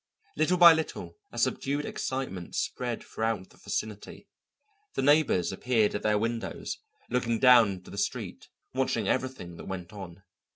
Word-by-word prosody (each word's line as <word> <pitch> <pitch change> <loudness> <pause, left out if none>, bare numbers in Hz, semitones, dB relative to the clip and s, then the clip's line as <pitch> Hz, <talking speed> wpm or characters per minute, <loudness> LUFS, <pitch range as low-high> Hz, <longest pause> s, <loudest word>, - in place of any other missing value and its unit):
Little 155 +4 +2
by 170 -1 +10
little 160 - -4
a - - -10
subdued 145 +2 0
excitement 130 -10 -4
spread 120 -2 -2
throughout 110 -4 -3
the - - -20
vicinity. 105 -2 -5 0.7
The - - 0
neighbours 145 - +3
appeared 110 +1 +1
at 105 - -2
their 105 -1 +2
windows, 115 +2 -3 0.3
looking 120 -2 +1
down 120 -3 +7
into 90 -1 -11
the - - -5
street, - - -4 0.2
watching 125 -5 0
everything 130 -10 -2
that - - -9
went 95 +1 -6
on. 95 -2 -9
115 Hz, 150 wpm, -28 LUFS, 100-130 Hz, 0.7 s, by